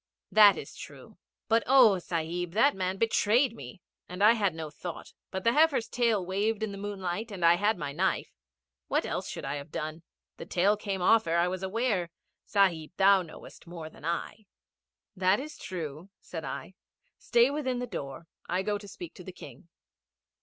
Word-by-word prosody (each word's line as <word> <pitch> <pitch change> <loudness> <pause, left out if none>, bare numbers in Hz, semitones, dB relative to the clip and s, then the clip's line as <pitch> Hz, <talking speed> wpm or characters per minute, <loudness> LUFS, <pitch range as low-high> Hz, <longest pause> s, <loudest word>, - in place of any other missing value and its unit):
'That 210 -2 +7
is - - -8
true; - - -12 0.3
but 225 +1 +3
oh, 245 -8 +6
Sahib, 170 0 -3
that 275 +8 +4
man 185 0 -2
betrayed 230 +3 +2
me 205 -4 -11 0.3
and 180 +3 -3
I 215 - +8
had 200 -7 +1
no 160 -2 -6
thought 170 +2 -8 0.2
but 190 -1 -5
the 230 - +3
heifer's 300 -6 +3
tail 230 -6 +1
waved 205 +4 -1
in 215 - -2
the 200 - -7
moonlight 200 +1 -4
and 185 -5 -2
I 170 - +7
had 205 +4 +1
my 145 -4 -4
knife. 185 +6 -1 0.6
What - - 0
else - - -3
should - - -6
I 140 +2 -2
have 145 +2 -9
done? 155 +2 -5 0.4
The - - -9
tail 195 +4 +3
came 195 -3 -4
off 220 +1 +4
ere 165 +1 +1
I 170 +1 +3
was 185 +1 -3
aware. 190 -2 -1 0.4
Sahib, 180 -7 +1
thou 195 0 +6
knowest 165 0 -12
more 165 -2 -8
than - - -17
I.' 180 +6 -4 0.7
'That 190 +1 +3
is 300 +3 -7
true,' 165 -1 -6
said 165 -3 -7
I. 140 +6 -6 0.5
'Stay 240 +2 +3
within 270 -4 -2
the 245 - -2
door. 145 - -7 0.2
I 180 +2 0
go 205 0 -1
to 205 - -11
speak 330 - -9
to - - -12
the - - -8
King.' - - -13
190 Hz, 190 wpm, -29 LUFS, 170-220 Hz, 0.7 s, I